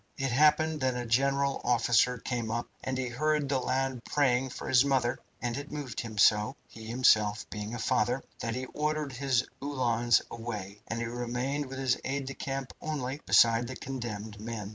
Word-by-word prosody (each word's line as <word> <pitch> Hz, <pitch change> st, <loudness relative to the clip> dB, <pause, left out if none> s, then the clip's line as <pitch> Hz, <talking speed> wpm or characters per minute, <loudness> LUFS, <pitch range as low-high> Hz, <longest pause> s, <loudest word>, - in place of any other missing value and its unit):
It 135 Hz, -1 st, -1 dB
happened 150 Hz, +3 st, +3 dB
that 130 Hz, -1 st, +1 dB
a 125 Hz, 0 st, -3 dB
general 140 Hz, +3 st, +1 dB
officer 125 Hz, +1 st, +3 dB
came 120 Hz, -2 st, -3 dB
up, 115 Hz, +2 st, -2 dB, 0.2 s
and 130 Hz, 0 st, -2 dB
he 130 Hz, -1 st, -1 dB
heard 150 Hz, +3 st, +1 dB
the 135 Hz, -1 st, +1 dB
lad 130 Hz, -1 st, -1 dB
praying 130 Hz, -2 st, +2 dB
for -, -, -7 dB
his 130 Hz, 0 st, +5 dB
mother, 130 Hz, -4 st, +1 dB, 0.2 s
and 120 Hz, 0 st, -2 dB
it 145 Hz, +2 st, -6 dB
moved 145 Hz, -6 st, -5 dB
him 110 Hz, -2 st, -6 dB
so 105 Hz, +4 st, +4 dB
he -, -, -14 dB
being 110 Hz, -, -9 dB
himself 110 Hz, -4 st, +3 dB
a 105 Hz, +3 st, -4 dB
father 125 Hz, +2 st, +1 dB, 0.2 s
that 115 Hz, 0 st, -2 dB
he 130 Hz, +1 st, -3 dB
ordered 150 Hz, -2 st, -1 dB
his 130 Hz, -2 st, +1 dB, 0.2 s
Uhlans 120 Hz, -4 st, +2 dB
away, 105 Hz, -4 st, -6 dB
and 115 Hz, -, -3 dB
he -, -, -1 dB
remained 125 Hz, +4 st, -2 dB
with 135 Hz, 0 st, -7 dB
his 130 Hz, -2 st, +1 dB
aide 135 Hz, +1 st, -2 dB
de 135 Hz, -, -5 dB
camp 135 Hz, -1 st, -4 dB
only, 145 Hz, -2 st, -3 dB
beside 115 Hz, +1 st, +5 dB
the 130 Hz, -, -6 dB
condemned 110 Hz, -6 st, -6 dB
men. 110 Hz, -2 st, -5 dB
125 Hz, 185 wpm, -30 LUFS, 115-135 Hz, 0.2 s, his